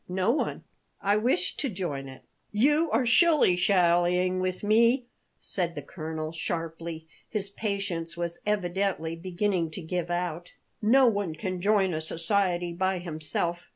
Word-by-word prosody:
"No 185 +4 +1
one; 290 - -2 0.4
I 200 +1 +2
wished 210 -5 +1
to 280 - 0
join 150 - -4
it." 130 - -12 0.3
"You 295 +9 +3
are 245 0 +2
shilly 300 - +5
shallying 180 0 +3
with 185 +1 -2
me," 230 +4 +4 0.3
said 175 -3 -3
the 145 - -5
colonel, 155 0 -5
sharply; 165 0 -4 0.2
his 200 -3 -2
patience 195 -6 -3
was 170 0 -3
evidently 190 -4 -1
beginning 180 0 -1
to - - -4
give 175 +1 -3
out. 175 -1 -3 0.3
"No 255 +5 +5
one 200 -8 +1
can 180 +3 -4
join 200 -2 +3
a 155 - -2
society 175 +1 0
by 190 +2 0
himself. 170 0 -3
180 Hz, 145 wpm, -27 LUFS, 170-205 Hz, 0.4 s, shilly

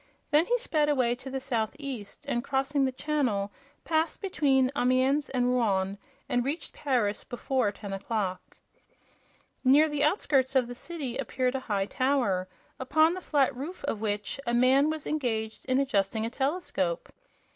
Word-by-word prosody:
Then 305 +3 +4
he - - +3
sped 305 -9 +1
away 255 -5 +2
to 265 - -8
the 265 0 -3
southeast 250 -2 -4
and, 240 -4 -1
crossing 275 +1 +1
the 260 - 0
channel, 255 -8 -1 0.3
passed 320 0 0
between 275 -9 +2
Amiens 260 +3 +2
and 250 -1 +1
Rouen 200 -5 +1 0.3
and 245 0 +1
reached 290 +4 -3
Paris 240 -8 0
before 250 -3 -1
ten 200 -1 -7
o'clock. 195 -2 -3 1.1
Near 280 +4 +6
the 295 -1 -1
outskirts 275 -5 +2
of 260 -2 +4
the 245 - -7
city 275 -2 -5
appeared 255 -1 -1
a 265 - -1
high 205 -6 -1
tower, 245 -7 +1 0.3
upon 315 +5 +3
the 370 - -5
flat 280 -7 +2
roof 300 +8 -7
of 225 -7 -2
which 210 +3 -2
a 235 - +1
man 260 +4 +5
was 310 -2 -3
engaged 225 -7 -2
in 255 0 +2
adjusting 220 -4 +1
a 230 - -3
telescope. 265 - -1
260 Hz, 155 wpm, -28 LUFS, 225-285 Hz, 1.1 s, Near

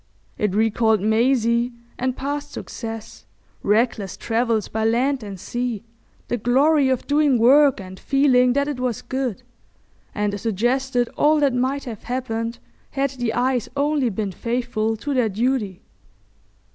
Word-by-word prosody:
It 210 -2 -1
recalled 220 0 +2
Maisie 235 +2 +2 0.3
and 255 0 -1
past 290 +1 -4
success, 225 -2 -7 0.3
reckless 210 -2 0
travels 225 -2 0
by 220 0 -2
land 250 +4 +1
and 200 -3 -8
sea, 240 0 -3 0.4
the 240 - -1
glory 270 +5 +3
of 260 -2 0
doing 290 -3 +3
work 270 +3 +5
and 185 -1 -9
feeling 255 -3 +3
that 280 +1 +1
it 290 -4 -3
was 250 -3 -2
good, 260 -5 -3 0.7
and 205 -1 -1
suggested 245 +4 0
all 305 +1 +2
that 280 -3 +3
might 260 +3 0
have 225 -5 -7
happened 230 -2 -3 0.3
had 275 -1 -1
the 245 -4 -2
eyes 250 -1 0
only 285 -3 +1
been 205 -1 -3
faithful 225 0 -2
to 285 +6 -3
their 250 -4 +2
duty. 215 -3 -1
245 Hz, 140 wpm, -22 LUFS, 220-265 Hz, 0.7 s, work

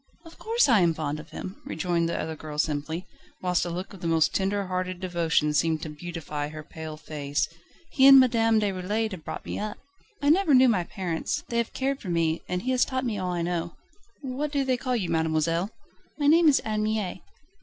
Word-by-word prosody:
"Of 330 - -14
course 460 -2 +2
I 235 -5 +5
am 170 -3 +3
fond 150 -1 -3
of 150 - -11
him," 185 - -8
rejoined 170 0 -1
the - - -2
other 160 0 -3
girl 155 -1 -8
simply, 155 +3 -1 0.3
whilst 180 -1 +1
a - - -3
look 180 +4 -5
of 190 - -12
the 170 - -2
most 165 -1 +3
tender 200 +1 0
hearted 185 -1 -3
devotion 170 -4 +1
seemed 160 +1 +1
to 155 - -4
beautify 150 -2 -5
her 155 0 -8
pale 155 0 -8
face. 145 -2 -2 0.4
"He 265 -1 +6
and 270 -1 +11
Madame 225 -3 +4
Déroulède 205 +2 -1
have 180 -5 -7
brought - - -6
me - - -4
up; 210 0 -4 0.4
I 285 0 +3
never 335 -4 +4
knew 255 0 +7
my 185 -6 +1
parents. 175 -3 -3
They 235 - -1
have 235 - -2
cared 270 +1 -1
for 190 - -6
me, 165 -1 +1
and 180 0 -2
he 255 - 0
has 255 -1 +3
taught 260 0 -2
me 215 -4 -2
all 180 -1 -2
I 175 -1 -1
know." 170 -1 -2 0.5
"What 280 +2 -3
do 280 -2 +1
they 260 -1 +2
call 250 0 -2
you, 185 -7 -1
mademoiselle?" 160 +3 +1 0.5
"My 290 - -1
name 320 +2 +6
is 280 - +5
Anne 215 -1 -2
Mie." 215 -4 -2
180 Hz, 220 wpm, -26 LUFS, 160-235 Hz, 0.5 s, and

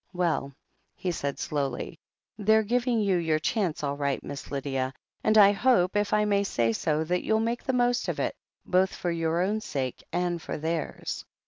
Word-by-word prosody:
"Well," 170 -6 0 0.4
he 180 - -2
said 140 -4 -3
slowly, 140 -4 -3 0.4
"they're 220 +1 +3
giving 240 +1 +1
you 195 -3 +2
your 160 -2 +1
chance 175 -1 -1
all 140 -1 -1
right. 140 -1 -1
Miss 140 - -7
Lydia. 135 -2 -2 0.3
And 215 0 +4
I 200 -1 +9
hope, 205 -4 +3
if 205 0 +1
I 210 0 +3
may 200 -1 +2
say 115 - +1
so, 155 +6 0
that 180 +3 -1
you'll 220 0 +2
make 230 +2 -1
the 260 - -1
most 245 0 +2
of - - -2
it, - - -1 0.3
both 185 +1 +2
for 175 - -2
your 165 +1 0
own 210 +3 0
sake 130 - -3
and 175 -1 -1
for - - -4
theirs." 160 +1 -3
180 Hz, 190 wpm, -27 LUFS, 150-210 Hz, 0.4 s, I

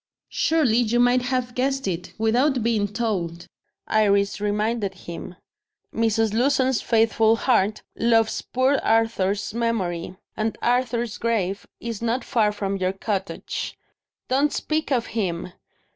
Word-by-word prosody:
"Surely 300 -9 +2
you 240 0 +2
might 245 +1 +4
have 250 0 -1
guessed 270 +1 -1
it, 180 -1 -3
without 245 +4 +2
being 220 -3 +1
told," 190 -6 -3 0.4
Iris 200 -2 +2
reminded 210 -1 -1
him. 175 0 -8 0.6
"Mrs. 225 -1 +1
Lewson's 260 +1 +2
faithful 225 -1 +3
heart 220 -4 +1
loves 225 -1 +2
poor 260 +2 +1
Arthur's 210 -3 +1
memory 190 -7 -2 0.2
and 220 0 -2
Arthur's 240 -2 0
grave 205 -4 -1
is 230 -2 -5
not 235 +2 0
far 220 -5 +2
from 200 -1 -2
your 185 0 0
cottage." 195 -1 -4 0.5
"Don't 280 +3 +2
speak 310 -1 -2
of 245 -4 +2
him!" 180 -5 -2
225 Hz, 125 wpm, -24 LUFS, 200-245 Hz, 0.6 s, might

